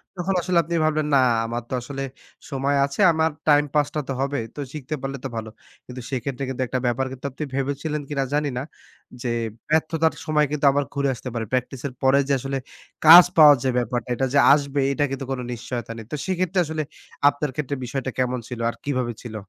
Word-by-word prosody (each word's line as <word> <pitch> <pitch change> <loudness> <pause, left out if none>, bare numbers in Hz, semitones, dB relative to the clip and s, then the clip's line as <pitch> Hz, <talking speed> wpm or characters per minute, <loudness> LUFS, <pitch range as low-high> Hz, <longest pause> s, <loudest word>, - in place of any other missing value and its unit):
তখন 180 +2 -1
আসলে 175 0 0
আপনি 170 +2 -3
ভাবলেন 155 -1 +1
না, - - +6 0.3
আমার 120 +1 -4
তো - - -5
আসলে 135 +2 -5 0.5
সময় 140 0 0
আছে, 140 +8 -8
আমার 160 0 +1 0.2
টাইম 150 -1 +5
পাসটা 150 +1 +1
তো 135 - -2
হবে। 140 0 -1 0.2
তো - - -8
শিখতে 155 0 -4
পারলে 135 0 -4
তো - - +1
ভালো। 110 -1 -4 0.4
কিন্তু 125 0 -8
সেক্ষেত্রে 135 +1 -3
কিন্তু 130 0 -4
একটা 130 - -1
ব্যাপার, 120 +2 +1
কিন্তু 130 +1 -9
আপনি 150 - -6
ভেবেছিলেন 145 +3 -2
কিনা 140 -2 0
জানি 150 0 +1
না। 130 - -2 0.6
যে 125 - -2 0.4
ব্যর্থতার 160 +1 +2
সময় 150 -1 +2
কিন্তু 150 -1 -1
আবার 145 +1 +1
ঘুরে 140 -1 0
আসতে 125 +1 -7
পারে। 115 -2 -2
প্র্যাকটিসের 130 +1 -2
পরে 135 +1 +5
যে 140 - +2
আসলে 135 +1 -3 0.5
কাজ 170 +3 +11
পাওয়ার 150 -3 +9 0.2
ব্যাপারটা, 120 0 -2
এটা 135 - 0
যে 145 - +5
আসবে, 140 -1 0
এটা 145 - 0
কিন্তু 135 0 -4
কোনো 125 -2 -3
নিশ্চয়তা 120 -1 -5
নেই। 115 - -8
তো - - -1
সেক্ষেত্রে 185 0 0
আসলে 155 0 -3 0.5
আপনার 145 0 -3
ক্ষেত্রে 145 -1 -2
বিষয়টা 130 +1 -3
কেমন 125 -1 0
ছিল 125 -2 -7
আর - - -6
কিভাবে 130 -4 -1
ছিল? 115 -3 -8
140 Hz, 200 wpm, -23 LUFS, 130-150 Hz, 0.6 s, কাজ